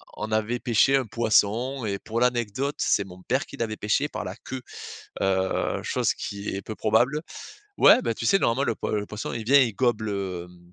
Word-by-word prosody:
on 110 +1 -5
avait 110 +3 0
pêché 120 +4 +3
un 135 -3 +1
poisson 115 +3 +1
et 100 -1 -1
pour 115 +4 -4
l'anecdote 125 +3 0
c'est 100 - +2
mon 90 -1 -13
père 130 +3 -1
qui 140 - -11
l'avait 110 -3 -3
pêché 105 +8 +1
par - - -5
la - - -5
queue. 130 -1 -5 0.6
Heu, 95 -1 0
chose - - 0
qui 100 0 -5
est 100 - -4
peu 110 - -7
probable 120 +9 +2 0.6
ouais, - - +7
bah, - - 0
tu - - -6
sais 195 - +5
normalement 120 +4 +2
le 115 - 0
poi - - -4
le 105 -1 -1
poisson 105 0 -5
il 115 -2 -5
vient 140 +5 +6
il 120 -3 +2
gobe 120 -2 +1
le, 95 -4 -3
hum 90 0 -19
110 Hz, 215 wpm, -25 LUFS, 100-125 Hz, 0.6 s, ouais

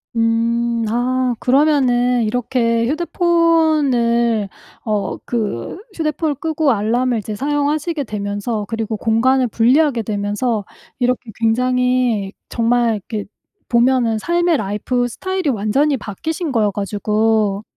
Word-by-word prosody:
음. 230 0 +1
아 250 +2 0
그러면은 250 -3 +3
이렇게 230 0 0
휴대폰을 300 - +2 0.4
어 210 -2 -1
그 215 - -3 0.2
휴대폰을 305 -1 -1
끄고 315 0 0
알람을 235 +3 +1
이제 215 0 -5
사용하시게 290 +4 -1
되면서 205 0 -3
그리고 225 0 -3
공간을 250 +4 +2
분리하게 245 +3 +2
되면서 205 +1 -2 0.3
이렇게 250 -2 -1
굉장히 250 -2 +1 0.2
정말 235 -1 +1
이렇게 215 -3 -3 0.4
보면은 235 -2 +2
삶의 345 +5 +1
life 215 +2 -1
style이 375 +7 -2
완전히 265 +6 +1
바뀌신 305 - -4
거여 215 -5 +1
가지고. 210 0 0
240 Hz, 285 characters per minute, -18 LUFS, 220-275 Hz, 0.4 s, 그러면은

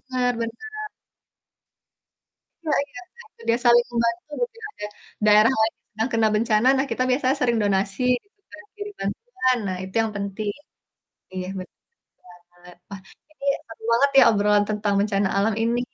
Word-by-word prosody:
benar 250 -1 +1
benar. 430 - -5 1.8
Iya 310 -2 +1
iya, 245 - -10 0.2
nah, 475 - -14
itu 470 - -20
dia 230 - +4
saling 240 0 +6
membantu, 235 +3 -1
mungkin 485 -1 -3
ada 210 - -7 0.4
daerah 215 +3 +6
lain 220 0 +2
yang - - -55
sedang 220 +3 -1
kena 225 -1 +3
bencana. 215 +1 +2
Nah, 270 - +1
kita 255 - 0
biasanya 255 +1 +2
saling 240 -2 +2
donasi, 200 +4 0 0.2
gitu 405 0 -39
kan, 210 - -11
kirim 415 0 -7
bantuan. 255 - -1
Nah, 185 -1 -2
itu 190 0 -10
yang 225 -1 -1
penting. 205 +1 -3 0.8
Iya, 185 -1 -4
betul 185 - -11 0.7
banget! 175 0 -16
Wah, 200 -1 -8 0.3
ini 295 -2 -11 0.2
seru 225 -1 -13
banget 270 +5 +4
ya, - - +9
obrolan 205 0 +3
tentang 210 -1 0
bencana 200 -1 +1
alam 210 +3 +2
ini. 235 +1 +1
230 Hz, 160 wpm, -23 LUFS, 205-255 Hz, 1.8 s, ya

